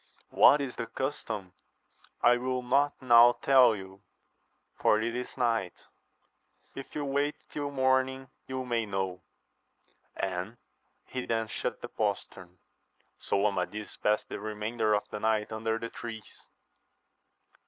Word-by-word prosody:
— -, -, -42 dB
What 145 Hz, -, +8 dB
is 135 Hz, -3 st, -5 dB
the 115 Hz, -, -3 dB
custom 110 Hz, -9 st, -4 dB, 0.4 s
%—l 120 Hz, 0 st, +1 dB
will 125 Hz, 0 st, -2 dB
not 140 Hz, +4 st, +2 dB
now 120 Hz, -1 st, +8 dB
tell 130 Hz, -4 st, +6 dB
you, 95 Hz, -1 st, -10 dB, 0.7 s
for 110 Hz, -, +3 dB
it 115 Hz, +2 st, -2 dB
is 125 Hz, +2 st, -5 dB
night: 115 Hz, -8 st, -1 dB, 0.9 s
if 135 Hz, -, -9 dB
you 145 Hz, -, -2 dB
wait 140 Hz, +2 st, 0 dB, 0.2 s
till 145 Hz, -1 st, -3 dB
morn 130 Hz, -1 st, +2 dB
ing 130 Hz, 0 st, -9 dB, 0.2 s
you 130 Hz, -1 st, -4 dB
may 115 Hz, -3 st, -1 dB
know. 95 Hz, -2 st, -3 dB, 0.9 s
And 95 Hz, +4 st, -3 dB, 0.5 s
he 125 Hz, -1 st, -5 dB
then 115 Hz, -1 st, 0 dB
shut -, -, -4 dB
the -, -, -5 dB
postern. 90 Hz, 0 st, -4 dB, 0.6 s
So 100 Hz, +1 st, 0 dB
Amadis 105 Hz, +1 st, -2 dB
passed 105 Hz, 0 st, +1 dB
the -, -, -6 dB
remainder 110 Hz, +1 st, -1 dB
of 105 Hz, -, -2 dB
the 105 Hz, -, -4 dB
night 110 Hz, 0 st, 0 dB
under 110 Hz, 0 st, -1 dB
the 115 Hz, 0 st, -5 dB
trees. 110 Hz, -4 st, -9 dB
115 Hz, 140 wpm, -29 LUFS, 105-130 Hz, 0.9 s, What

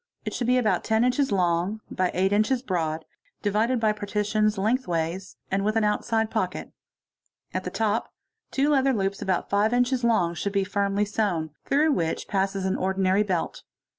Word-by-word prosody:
It -, -, -3 dB
should 240 Hz, -, -2 dB
be 250 Hz, +1 st, +4 dB
about 235 Hz, -4 st, +1 dB
10 220 Hz, +1 st, +2 dB
inches 250 Hz, +1 st, +1 dB
long 180 Hz, +2 st, +1 dB
by 185 Hz, -1 st, 0 dB
8 190 Hz, +2 st, +2 dB
inches 230 Hz, +5 st, +2 dB
broad, 160 Hz, -7 st, -2 dB, 0.4 s
divided 220 Hz, +4 st, +1 dB
by 220 Hz, -1 st, +3 dB
partitions 210 Hz, 0 st, 0 dB
lengthways 190 Hz, -5 st, -1 dB
and 195 Hz, +1 st, +1 dB
with 215 Hz, +2 st, 0 dB
an 225 Hz, -, +2 dB
outside 220 Hz, +1 st, 0 dB
pocket. -, -, -2 dB, 0.8 s
the -, -, -2 dB
top 220 Hz, 0 st, -1 dB, 0.4 s
two 275 Hz, +2 st, +1 dB
leather 270 Hz, -2 st, +3 dB
loops 195 Hz, -2 st, -1 dB
about 185 Hz, -2 st, -1 dB
5 205 Hz, +2 st, +3 dB
inches 245 Hz, 0 st, +1 dB
long 220 Hz, -8 st, +2 dB
should 200 Hz, +4 st, -3 dB
be 200 Hz, -1 st, +2 dB
firmly 200 Hz, +1 st, 0 dB
sey 210 Hz, +2 st, -2 dB
n. 160 Hz, -3 st, -3 dB, 0.2 s
through 300 Hz, +3 st, +3 dB
which 165 Hz, -, -1 dB
passes 195 Hz, -1 st, -1 dB
an 190 Hz, -, 0 dB
ordinary 190 Hz, +1 st, +1 dB
belt. 185 Hz, -5 st, -2 dB
205 Hz, 170 wpm, -25 LUFS, 190-225 Hz, 0.8 s, be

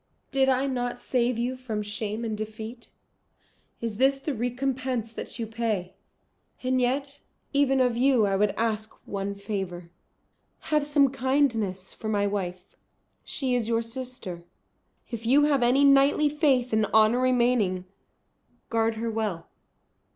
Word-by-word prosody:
Did 270 Hz, -1 st, +3 dB
I 260 Hz, +1 st, +2 dB
not 245 Hz, -2 st, -2 dB
save 245 Hz, -1 st, 0 dB
you 245 Hz, +2 st, -1 dB
from 225 Hz, -5 st, -4 dB
shame 215 Hz, +2 st, -3 dB
and 220 Hz, -1 st, -2 dB
defeat? 220 Hz, +2 st, -7 dB, 0.9 s
Is 225 Hz, -3 st, -3 dB
this 270 Hz, +2 st, +3 dB
the 290 Hz, +2 st, -3 dB
recompense 245 Hz, -1 st, -2 dB
that -, -, -6 dB
you 230 Hz, -, -2 dB
pay? 220 Hz, -5 st, -2 dB, 0.7 s
And 255 Hz, 0 st, +1 dB
yet 275 Hz, +3 st, -1 dB, 0.3 s
even 275 Hz, -1 st, +3 dB
of 250 Hz, -2 st, +3 dB
you 250 Hz, -2 st, +4 dB
I 195 Hz, -1 st, +1 dB
would 205 Hz, +1 st, +3 dB
ask 220 Hz, -1 st, -1 dB
one 200 Hz, 0 st, -3 dB
favour. 190 Hz, -4 st, -5 dB, 0.8 s
Have 300 Hz, -1 st, +3 dB
some 285 Hz, -2 st, +3 dB
kindness 245 Hz, -8 st, 0 dB
for 220 Hz, -, -6 dB
my 205 Hz, -1 st, +1 dB
wife. 185 Hz, -3 st, -4 dB, 0.5 s
She 260 Hz, -3 st, -2 dB
is 240 Hz, -3 st, 0 dB
your 230 Hz, 0 st, +1 dB
sister; 230 Hz, -7 st, -7 dB, 0.7 s
if 230 Hz, -1 st, -5 dB
you 280 Hz, +4 st, +5 dB
have 290 Hz, -3 st, +3 dB
any 250 Hz, +4 st, +4 dB
knightly 280 Hz, +2 st, +5 dB
faith 270 Hz, -5 st, +2 dB
and 215 Hz, -1 st, +3 dB
honour 220 Hz, +3 st, +4 dB
remaining, 240 Hz, -7 st, +2 dB, 0.9 s
guard 225 Hz, -1 st, +1 dB
her 225 Hz, +1 st, -2 dB
well." 210 Hz, -7 st, -3 dB
235 Hz, 145 wpm, -27 LUFS, 215-260 Hz, 0.9 s, you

